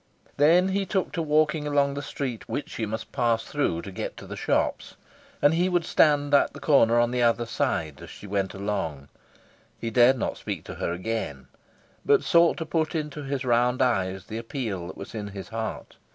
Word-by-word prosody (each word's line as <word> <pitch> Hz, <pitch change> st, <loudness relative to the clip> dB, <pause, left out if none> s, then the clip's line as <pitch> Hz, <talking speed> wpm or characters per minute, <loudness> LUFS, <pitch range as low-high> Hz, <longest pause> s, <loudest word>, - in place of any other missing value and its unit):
Then 170 Hz, +6 st, +5 dB
he 195 Hz, +1 st, 0 dB
took 190 Hz, -1 st, -1 dB
to 170 Hz, -, -2 dB
walking 150 Hz, 0 st, +2 dB
along 140 Hz, -1 st, +2 dB
the 140 Hz, -, -4 dB
street 135 Hz, -4 st, -5 dB
which 145 Hz, -, -4 dB
she 110 Hz, -, -3 dB
must 110 Hz, +1 st, -5 dB
pass 115 Hz, -2 st, +1 dB
through 110 Hz, -, -1 dB
to 100 Hz, -, -7 dB
get 90 Hz, -, -5 dB
to -, -, -9 dB
the -, -, -7 dB
shops, -, -, -1 dB, 0.5 s
and 145 Hz, -, +6 dB
he 175 Hz, +3 st, +2 dB
would 175 Hz, -2 st, +1 dB
stand 145 Hz, -2 st, +3 dB
at 140 Hz, -, +4 dB
the -, -, -9 dB
corner, 120 Hz, -6 st, +4 dB
on 120 Hz, 0 st, +2 dB
the 125 Hz, 0 st, 0 dB
other 120 Hz, 0 st, +2 dB
side, 80 Hz, -9 st, -2 dB
as -, -, -10 dB
she -, -, -11 dB
went 100 Hz, -1 st, -2 dB
along. 90 Hz, -9 st, -3 dB, 0.7 s
He 115 Hz, -, -3 dB
dared 125 Hz, +3 st, +5 dB
not -, -, -2 dB
speak -, -, -5 dB
to -, -, -8 dB
her -, -, 0 dB
again, 90 Hz, -, -4 dB, 0.5 s
but -, -, +4 dB
sought 170 Hz, 0 st, +4 dB
to 160 Hz, -, -3 dB
put 160 Hz, +1 st, -1 dB
into 150 Hz, -2 st, -3 dB
his 135 Hz, -1 st, -3 dB
round 125 Hz, +1 st, +2 dB
eyes 95 Hz, -7 st, 0 dB
the 110 Hz, +1 st, -5 dB
appeal 115 Hz, -7 st, -4 dB
that -, -, -9 dB
was 100 Hz, -, -9 dB
in 105 Hz, -2 st, -4 dB
his 100 Hz, -2 st, -8 dB
heart. 110 Hz, 0 st, -5 dB
120 Hz, 205 wpm, -26 LUFS, 105-150 Hz, 0.7 s, and